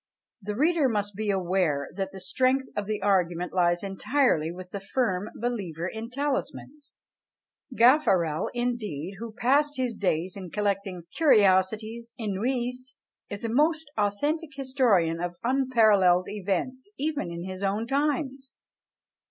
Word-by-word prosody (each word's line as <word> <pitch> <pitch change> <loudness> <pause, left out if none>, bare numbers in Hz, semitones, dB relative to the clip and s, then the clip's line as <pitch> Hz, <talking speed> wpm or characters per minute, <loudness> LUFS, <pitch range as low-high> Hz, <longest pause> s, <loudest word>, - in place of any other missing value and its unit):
The 205 +1 -4
reader 305 +1 +3
must 205 -3 -2
be 215 +1 -2
aware 180 -7 +1
that 195 0 -3
the 195 - -9
strength 260 +6 +1
of 205 -1 -2
the 215 -1 -2
argument 180 -3 +1
lies 175 -1 +2
entirely 195 - +1
with 180 +1 -10
the 200 - -4
firm 195 -1 -1
believer 195 -9 -3
in 220 +3 -6
talismans. 280 +1 -4 0.8
Gaffarel, 210 - +4
indeed, 210 -8 -3
who 230 0 -6
passed 280 +6 +2
his 250 -3 -1
days 180 -2 -1
in 190 -3 -7
collecting 200 -2 -2
"Curiosités 220 - +3
inouïes," 245 +5 -2 0.3
is 205 +1 -6
a - - -1
most 305 +4 +1
authentic 290 +10 -1
historian 235 -12 +2
of 175 0 -3
unparalleled 220 -8 +4
events, 210 - -3
even 290 - -2
in 170 0 -6
his 185 +1 -6
own 200 +3 0
times! 275 0 -1
215 Hz, 130 wpm, -27 LUFS, 185-260 Hz, 0.8 s, Gaffarel